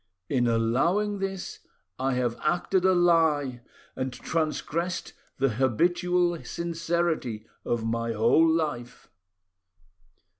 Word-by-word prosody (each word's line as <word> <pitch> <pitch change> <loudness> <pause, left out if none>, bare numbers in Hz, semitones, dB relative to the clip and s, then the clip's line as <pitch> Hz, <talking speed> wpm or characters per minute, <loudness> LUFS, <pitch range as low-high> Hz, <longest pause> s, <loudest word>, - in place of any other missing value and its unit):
In 125 -2 +2
allowing 165 - +1
this, 195 -1 -4 0.4
I 135 0 0
have 120 -2 0
acted 175 +3 +1
a 190 - +5
lie, 160 -7 +2 0.3
and 130 0 -2
transgressed 165 +4 -2 0.2
the 135 0 +2
habitual 175 - +1
sincerity 165 -9 -2 0.2
of 115 -1 -1
my 115 0 -1
whole 120 +9 +4
life." 150 -7 -2
155 Hz, 100 wpm, -27 LUFS, 120-175 Hz, 0.4 s, a